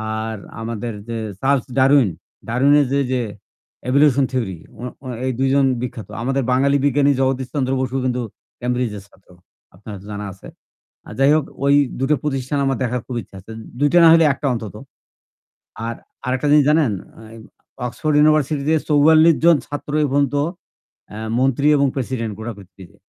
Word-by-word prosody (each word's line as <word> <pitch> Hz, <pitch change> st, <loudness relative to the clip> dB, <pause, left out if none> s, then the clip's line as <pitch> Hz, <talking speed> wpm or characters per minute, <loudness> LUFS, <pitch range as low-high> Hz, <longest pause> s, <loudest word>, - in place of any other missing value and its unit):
আর 110 Hz, 0 st, -4 dB, 0.3 s
আমাদের 115 Hz, 0 st, -4 dB, 0.2 s
যে 115 Hz, -, -3 dB, 0.2 s
'Charles 135 Hz, -1 st, +1 dB
Darwin' 135 Hz, -6 st, +4 dB, 0.4 s
ডারউইনের 140 Hz, +5 st, +3 dB
যে, 140 Hz, -, +2 dB
যে, 125 Hz, -1 st, 0 dB, 0.7 s
evolution 140 Hz, 0 st, +4 dB
theory, 110 Hz, -9 st, -2 dB, 0.2 s
ও -, -, -9 dB, 0.2 s
ও -, -, -14 dB, 0.2 s
এই 130 Hz, -, 0 dB
২ 135 Hz, 0 st, +2 dB
জন 140 Hz, -1 st, +4 dB, 0.2 s
বিখ্যাত। 115 Hz, -3 st, -6 dB
আমাদের 135 Hz, +2 st, -1 dB
বাঙালি 140 Hz, +2 st, +3 dB
বিজ্ঞানী 145 Hz, +1 st, +3 dB
'জগদীশ 130 Hz, -1 st, 0 dB
চন্দ্র 135 Hz, -3 st, -1 dB
বসু' 130 Hz, +1 st, -2 dB
কিন্তু 125 Hz, -1 st, -1 dB, 0.4 s
ক্যামব্রিজের 120 Hz, -5 st, -2 dB
ছাত্র। 95 Hz, -2 st, -27 dB, 0.5 s
আপনার 105 Hz, 0 st, -11 dB
হয়তো 100 Hz, +1 st, -10 dB
জানা 105 Hz, 0 st, -5 dB
আছে। 95 Hz, -, -14 dB, 0.6 s
আ -, -, -10 dB
যাই 135 Hz, +1 st, +5 dB
হোক, 155 Hz, -3 st, 0 dB, 0.2 s
ওই 140 Hz, 0 st, +5 dB, 0.2 s
দুটো 140 Hz, +3 st, +2 dB
প্রতিষ্ঠান 135 Hz, -1 st, -2 dB
আমার 135 Hz, -1 st, 0 dB
দেখার 125 Hz, 0 st, -2 dB
খুব 125 Hz, -, -5 dB
ইচ্ছা 95 Hz, -, -17 dB
আছে। 110 Hz, -, -13 dB, 0.3 s
২ 145 Hz, -, +3 dB
টা 175 Hz, -, +7 dB
না 165 Hz, -, +8 dB
হলে 165 Hz, -1 st, +5 dB
একটা 140 Hz, +1 st, -4 dB
অন্তত। 110 Hz, -3 st, -6 dB, 1.1 s
আর 115 Hz, -, -3 dB, 0.3 s
আরেকটা 130 Hz, +3 st, -1 dB
জিনিস 150 Hz, -2 st, +5 dB
জানেন? 150 Hz, -7 st, +3 dB, 0.4 s
আই 115 Hz, -, -12 dB, 0.5 s
অক্সফোর্ড 150 Hz, +4 st, -2 dB
ইউনিভার্সিটিতে 150 Hz, 0 st, +2 dB, 0.2 s
৪৪ 155 Hz, +2 st, +5 dB
জন 170 Hz, -1 st, +7 dB
ছাত্র 145 Hz, 0 st, -6 dB
এ -, -, +3 dB
পর্যন্ত 140 Hz, 0 st, +1 dB, 0.7 s
এ্যা 105 Hz, -, -9 dB, 0.2 s
মন্ত্রী 135 Hz, +2 st, +1 dB
এবং 140 Hz, 0 st, +3 dB
প্রেসিডেন্ট 120 Hz, -4 st, -3 dB
গোটা 115 Hz, +1 st, -5 dB
পৃথিবীতে। 95 Hz, -2 st, -15 dB
130 Hz, 165 wpm, -20 LUFS, 115-145 Hz, 1.1 s, না